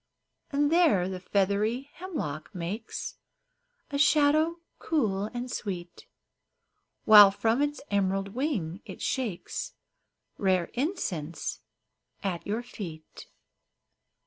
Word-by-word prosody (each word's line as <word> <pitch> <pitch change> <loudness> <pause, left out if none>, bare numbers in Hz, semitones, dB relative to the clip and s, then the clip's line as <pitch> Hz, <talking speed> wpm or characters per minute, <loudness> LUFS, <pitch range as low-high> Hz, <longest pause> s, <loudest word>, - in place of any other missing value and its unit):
And 290 +1 +1
there 315 - +4
the 185 -1 -4
feathery 205 +8 0
hemlock 190 - -5
makes 190 +6 -5 0.7
A 280 - -1
shadow 305 +2 +4 0.2
cool 210 -11 0
and 245 +3 -5
sweet, 180 -6 -5 1.0
While 210 -2 +10
from 225 +6 +1
its 290 0 -1
emerald 195 0 +1
wing 205 - -2
it - - -9
shakes 230 -9 -3 0.7
Rare 185 -3 +1
incense 185 - -3 0.6
at 185 -4 -3
your 220 +4 -1
feet. 165 -9 -9
210 Hz, 95 wpm, -28 LUFS, 185-280 Hz, 1.0 s, While